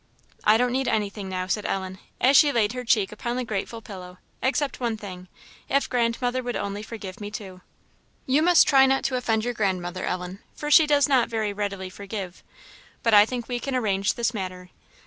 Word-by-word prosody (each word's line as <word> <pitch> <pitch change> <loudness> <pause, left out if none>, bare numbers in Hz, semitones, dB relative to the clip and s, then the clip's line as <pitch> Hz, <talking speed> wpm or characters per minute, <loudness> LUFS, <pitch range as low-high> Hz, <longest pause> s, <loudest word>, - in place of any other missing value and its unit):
"I 215 +1 +5
don't 245 +1 +1
need 265 0 0
anything 205 -3 -2
now," 185 -1 -3
said 210 +3 -1
Ellen, 190 -1 -3 0.2
as 265 +3 +4
she 290 +1 +7
laid 225 -4 +1
her 250 0 -5
cheek 220 -5 +2
upon 235 +3 -4
the 255 - -1
grateful 225 +1 -4
pillow, 180 -3 -10 0.2
"except 275 +3 0
one 235 -3 -1
thing 185 -4 -9 0.4
if 275 +1 +2
grandmother 245 +1 0
would 245 -1 -4
only 200 +1 -3
forgive 210 -3 -8
me 205 - -5
too." 190 -3 -8 0.6
"You 270 +3 +3
must 345 0 +6
try 270 -2 +6
not 270 0 +1
to 260 - 0
offend 225 -3 0
your 245 - -1
grandmother, 185 -4 -2
Ellen, 180 +1 -4 0.2
for 295 0 -4
she 315 0 +7
does 290 -1 +4
not 260 -4 +3
very 220 -3 -1
readily 200 -2 -4
forgive; 195 -2 -7 0.6
but 230 - +2
I 205 0 +8
think 245 -1 -4
we 245 -1 -2
can 270 +1 -3
arrange 205 -4 +1
this 235 0 0
matter. 185 -3 -6
220 Hz, 200 wpm, -25 LUFS, 195-250 Hz, 0.6 s, I